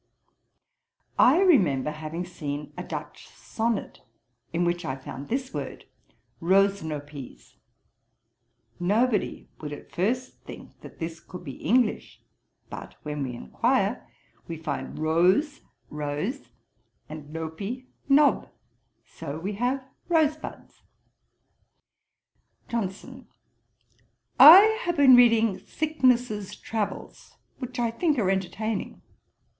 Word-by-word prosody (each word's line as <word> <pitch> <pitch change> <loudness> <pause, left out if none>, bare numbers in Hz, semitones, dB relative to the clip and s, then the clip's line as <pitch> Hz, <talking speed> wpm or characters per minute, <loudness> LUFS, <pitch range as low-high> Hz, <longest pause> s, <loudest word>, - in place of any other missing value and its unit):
'I 300 +9 +6
remember 165 - +3
having 155 +3 -5
seen 150 -4 -6
a - - -5
Dutch - - -7
Sonnet, 225 -1 -3 0.5
in 175 +1 0
which 175 0 -1
I 130 - -3
found 135 +1 -9
this 260 +2 -2
word, - - -6 0.6
roesnopies. 155 - -1 1.2
Nobody 210 +4 0
would 150 -1 -6
at 145 - -10
first 245 +8 -2
think - - -12
that - - -12
this 165 0 -5
could 180 -1 -11
be 140 -5 -8
English; 235 +5 +1 0.5
but, - - -9
when 150 -1 -4
we 125 -3 -3
enquire, 65 - -1 0.4
we 165 - -5
find 160 - -5
roes, 180 - +2 0.3
rose, 150 - -4 0.6
and 150 -1 -9
nopie, 180 +11 -5 0.2
knob; 285 0 +4 0.6
so 140 +2 -7
we 190 +6 -4
have 250 +5 -1 0.3
rosebuds'. 310 -2 -1 1.9
JOHNSON. 200 -5 -5 1.1
'I 330 +5 +12 0.2
have 345 -6 -2
been 270 -3 +8
reading 230 -5 +5
Thicknesse's 250 -6 0
Travels, 220 -2 -5 0.2
which 255 -1 -6
I 235 -2 0
think 300 +5 0
are 195 -5 +2
entertaining.' 195 +3 -3
195 Hz, 105 wpm, -26 LUFS, 155-250 Hz, 1.9 s, I